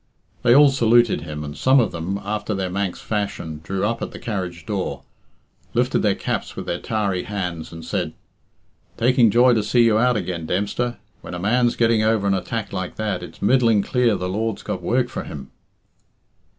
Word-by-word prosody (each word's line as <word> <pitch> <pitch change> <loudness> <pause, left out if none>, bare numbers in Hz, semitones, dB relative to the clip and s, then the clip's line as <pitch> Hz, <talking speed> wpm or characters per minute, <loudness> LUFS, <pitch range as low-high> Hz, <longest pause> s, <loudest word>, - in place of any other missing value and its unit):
They 120 0 +5
all 145 0 +8
saluted 120 -3 +3
him, 75 -2 -6
and 75 0 -6
some 130 +1 +4
of 120 - +1
them, 90 +4 -3
after 105 +1 -2
their 95 -2 -2
Manx 100 -1 -2
fashion, 100 -7 -3
drew 95 +3 -2
up 115 +2 -1
at - - -3
the - - -10
carriage 95 -7 -4
door, 100 -3 -3 0.7
lifted - - +2
their - - +2
caps - - -3
with - - -6
their 85 - -2
tarry 100 -5 -1
hands, 90 -6 -4
and 80 -1 -9
said - - -2 0.8
"Taking 125 -1 +4
joy 120 +4 +5
to 110 - +2
see 120 +3 +3
you 110 -2 +4
out 125 -1 +3
again, 85 -4 -4
Dempster. 105 +6 -1 0.2
When - - -7
a - - -5
man's 120 +5 +2
getting 115 -2 +3
over 110 -1 +2
an 100 - +3
attack 110 +4 -3
like 90 -1 -4
that, 105 -4 -2
it's 90 - -10
middling 115 -2 +4
clear 125 -2 +2
the 90 - -3
Lord's 110 +3 -2
got - - -4
work - - +1
for - - -5
him." 70 -2 -9
105 Hz, 190 wpm, -22 LUFS, 90-115 Hz, 0.8 s, all